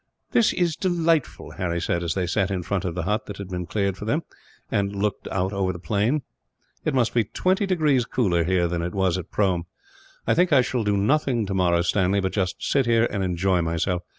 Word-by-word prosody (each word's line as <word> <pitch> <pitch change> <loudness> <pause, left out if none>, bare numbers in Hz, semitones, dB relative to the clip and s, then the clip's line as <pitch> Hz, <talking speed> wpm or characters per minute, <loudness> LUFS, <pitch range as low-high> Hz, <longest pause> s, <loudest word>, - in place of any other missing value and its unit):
"This 230 - +4
is 170 -3 +1
delightful!" 165 -5 0
Harry 85 -2 -1
said, 85 0 -1
as 85 -1 -2
they 95 -2 0
sat 95 +2 0
in 95 -2 -2
front 95 +1 -2
of 85 -2 -3
the 90 - -2
hut 105 +4 -1
that 105 - -7
had 100 -2 -7
been 90 -2 -4
cleared 100 0 -1
for 105 - -7
them, 150 +9 0 0.5
and 100 0 0
looked 100 0 -2
over 95 0 -1
the 90 - -7
plain. 110 - 0 0.6
"It - - 0
must 120 -3 +2
be 120 - +3
twenty 190 - 0
degrees 150 -9 +2
cooler, 90 -11 +1
here, 90 0 +2
than 85 0 -2
it 90 +2 -4
was 95 -2 +1
at 90 - -8
Prome. 90 -4 0 0.6
I - - +3
think 180 +1 +3
I 140 -3 +6
shall 125 -1 -1
do 105 -1 +1
nothing 125 +1 +1
tomorrow, 90 -3 +2
Stanley, 95 +2 +2
but 95 -1 -1
just 95 -3 0
sit 135 -3 +1
here 115 0 +4
and 100 -2 -1
enjoy 90 0 +1
myself. 85 +2 -1
100 Hz, 215 wpm, -24 LUFS, 90-120 Hz, 0.6 s, I